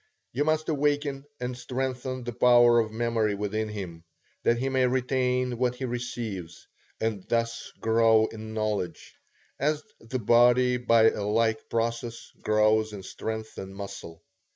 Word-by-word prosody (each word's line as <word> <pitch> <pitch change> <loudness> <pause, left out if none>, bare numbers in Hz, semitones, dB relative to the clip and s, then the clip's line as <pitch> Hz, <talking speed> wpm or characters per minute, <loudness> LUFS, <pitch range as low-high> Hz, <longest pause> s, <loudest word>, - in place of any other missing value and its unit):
You 145 +5 0
must 155 0 +1
awaken 145 -2 0
and 125 0 -3
strengthen 130 0 -3
the 120 0 -5
power 120 0 +6
of 110 -1 0
memory 115 -2 0
within 105 +2 -2
him, 90 -6 -7 0.4
that 120 - +2
he 130 +3 -1
may 130 -1 +2
retain 125 -1 0
what 125 -1 +1
he 130 - -4
receives, 115 -8 -5 0.3
and 110 -4 -2
thus 115 0 -1
grow 115 -1 +4
in 110 0 -7
knowledge, 105 -4 -3 0.5
as 150 +2 0 0.2
the 115 +3 -4
body 125 +2 +4
by 115 -2 +5
a - - -5
like 110 +1 0
process 115 0 -2
grows 110 0 +2
in 100 -2 -7
strength 110 +3 -5
and 95 0 -8
muscle. 85 -4 -8
115 Hz, 145 wpm, -27 LUFS, 110-125 Hz, 0.5 s, power